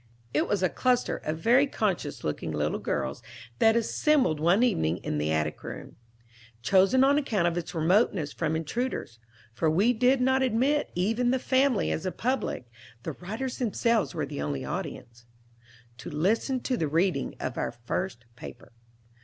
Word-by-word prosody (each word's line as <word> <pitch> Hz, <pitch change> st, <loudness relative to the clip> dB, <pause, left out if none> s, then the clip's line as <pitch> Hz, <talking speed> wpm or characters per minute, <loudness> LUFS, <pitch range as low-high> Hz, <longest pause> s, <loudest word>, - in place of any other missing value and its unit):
It -, -, +1 dB
was 200 Hz, -2 st, 0 dB
a 185 Hz, -, +3 dB
cluster 250 Hz, +5 st, +1 dB
of 155 Hz, +1 st, -4 dB
very 245 Hz, -, +4 dB
conscious 190 Hz, -, -2 dB
looking 75 Hz, +2 st, -3 dB
little 75 Hz, 0 st, -1 dB
girls 65 Hz, -, -3 dB, 0.4 s
that 225 Hz, 0 st, +5 dB
assembled 235 Hz, -, +2 dB
one 175 Hz, +9 st, +3 dB
evening 85 Hz, -, +1 dB
in 75 Hz, -, -2 dB
the 75 Hz, +1 st, 0 dB
attic 75 Hz, -1 st, -1 dB
room, -, -, -8 dB, 0.7 s
chosen 195 Hz, -, +4 dB
on 280 Hz, +2 st, +4 dB
account 210 Hz, -11 st, 0 dB
of 170 Hz, -, 0 dB
its 175 Hz, 0 st, -4 dB
remoteness 165 Hz, -1 st, +2 dB
from 160 Hz, -1 st, -1 dB
intruders 160 Hz, -, -3 dB, 0.3 s
(for 155 Hz, +7 st, +1 dB
we 200 Hz, +10 st, +3 dB
did 250 Hz, +3 st, +3 dB
not 260 Hz, +1 st, +2 dB
admit 265 Hz, +4 st, +1 dB
even 225 Hz, +7 st, +1 dB
the 260 Hz, -, +2 dB
family 260 Hz, -2 st, +2 dB
as 170 Hz, +4 st, -2 dB
a -, -, -1 dB
public, 250 Hz, -, -2 dB, 0.4 s
the -, -, -3 dB
writers 220 Hz, +8 st, -5 dB
themselves 230 Hz, -, +1 dB
were -, -, -1 dB
the -, -, -6 dB
only 70 Hz, -2 st, -3 dB
audience), 115 Hz, -, -6 dB, 0.7 s
to -, -, -7 dB
listen 220 Hz, -, 0 dB
to 255 Hz, 0 st, -1 dB
the 160 Hz, -, 0 dB
reading 165 Hz, -1 st, 0 dB
of 125 Hz, -, -4 dB
our -, -, -2 dB
first 120 Hz, +3 st, -4 dB
paper. 120 Hz, 0 st, -11 dB
190 Hz, 165 wpm, -27 LUFS, -, 0.7 s, that